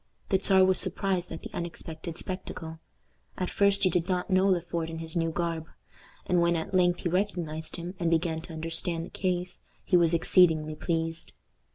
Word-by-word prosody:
The 190 - +3
Czar 190 -1 +5
was 185 -1 +5
surprised 185 -1 0
at 165 - -7
the - - -9
unexpected 165 -1 -6
spectacle. 165 -4 -6 0.6
At 185 - -2
first 200 0 +3
he 185 - +6
did 175 +2 0
not 180 +1 -1
know 185 +1 +4
Le 185 -2 +3
Fort 170 -1 -4
in 165 - -6
his 160 0 -3
new 165 -1 +1
garb; 165 -1 -2 0.6
and 180 -1 +2
when 170 0 +3
at 160 +3 -4
length 180 -1 +3
he 175 - -1
recognized 170 -4 -2
him, 175 +1 -6
and 170 -2 +1
began 165 -1 0
to 170 0 -10
understand 165 +1 -1
the - - -13
case, 180 -1 -2 0.2
he 185 - +1
was 170 -1 +4
exceedingly 160 -2 +4
pleased. 165 +1 -2
170 Hz, 190 wpm, -28 LUFS, 165-185 Hz, 0.6 s, he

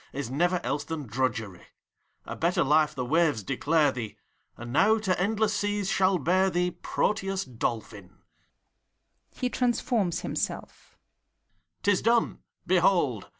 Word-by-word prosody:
Is 135 -3 -4
never 175 +6 +1
else 145 +1 -2
than 150 -1 -5
drudgery: 110 -5 -2 0.6
A - - -6
better 170 +2 +1
life 150 +2 +3
the 125 - -3
waves 150 -5 +2
declare 145 - +2
thee, 120 -5 -6 0.4
And 120 +1 -8
now 215 +9 +4
to 190 -5 -1
endless 215 +2 +1
seas 205 -1 -1
shall 190 0 +3
bear 185 +5 +2
thee 180 0 0
Proteus 195 +2 -1
Dolphin. 110 -6 -5 1.1
{He 250 - -2
transforms 235 -8 0
himself,) - - -5 0.9
'T 205 - +4
is 185 - +1
done! 230 0 +2 0.3
Behold! 170 - +2
170 Hz, 130 wpm, -27 LUFS, 130-195 Hz, 1.1 s, now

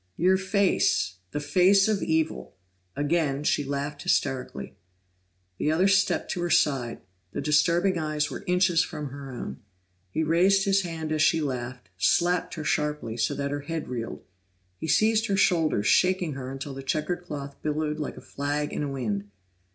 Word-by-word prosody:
Your 185 +3 +4
face 190 - +1
the 145 - -3
face 185 +7 +4
of 215 -2 +1
evil!" 160 0 -1 0.4
Again 145 -1 0
she 150 - +1
laughed 145 +1 -4
hysterically. 125 - -1 0.9
The 150 - +1
other 180 +5 +3
stepped 195 0 +2
to 175 - -2
her 175 - -1
side; 130 -8 +1 0.3
the - - -3
disturbing 170 +5 +2
eyes 155 -1 -1
were - - -6
inches 180 -2 +3
from 150 -5 -5
her 140 0 -8
own. 125 0 -6 0.5
He 160 +12 -1
raised 185 +5 +3
his 195 0 +3
hand 165 -3 -5
as 155 -1 +1
she 160 +1 +4
laughed, 125 - -4
slapped 175 - +2
her 155 - -5
sharply, 150 -6 -1
so 120 - 0
that 140 0 -2
her 145 0 -2
head 160 0 -5
reeled. 120 -2 -5 0.6
He - - -4
seized 220 +6 +3
her 195 - +1
shoulders, 165 - +2
shaking 180 - +3
her 130 -1 -6
until 135 +1 -6
the 135 - -7
checkered 155 +6 -2
cloth 140 -4 -6
billowed 150 0 -1
like 150 - -4
a - - -9
flag 145 +1 -3
in - - -2
a 145 - -2
wind. 110 -7 -2
155 Hz, 170 wpm, -26 LUFS, 140-175 Hz, 0.9 s, Your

